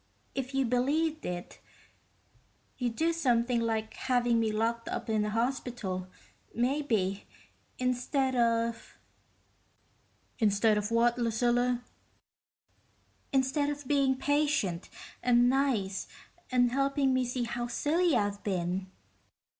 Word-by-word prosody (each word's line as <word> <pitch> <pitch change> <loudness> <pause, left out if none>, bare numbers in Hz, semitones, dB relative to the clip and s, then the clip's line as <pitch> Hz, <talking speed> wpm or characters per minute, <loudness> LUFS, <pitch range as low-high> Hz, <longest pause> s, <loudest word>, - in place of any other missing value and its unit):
If 270 0 -4
you 270 -1 +2
believed 300 +6 0
it, 175 0 -6 1.2
you'd 240 -3 -1
do 330 +4 +1
something 245 -6 +2
like 220 -1 -1
having 245 -2 +1
me 220 -1 +1
locked 230 +2 -1
up - - -3
in 215 -1 +2
a 210 - -1
hospital, 230 -5 -2 0.5
maybe, 235 -7 0 0.5
instead 255 +1 0
of...." 230 -1 0 1.4
"Instead 210 0 +3
of 210 0 -3
what, 235 +1 +2
Lucilla?" 245 +1 +1 1.5
"Instead 270 +2 +1
of 290 -2 -5
being 275 -2 +3
patient, 285 - 0 0.3
and 245 0 +4
nice, 245 -8 0 0.4
and 245 -1 +3
helping 275 0 +1
me 255 0 +2
see 245 0 -2
how 240 +1 -3
silly 315 +6 +1
I've 205 -2 -1
been." 185 -1 -2
245 Hz, 110 wpm, -30 LUFS, 225-270 Hz, 1.5 s, and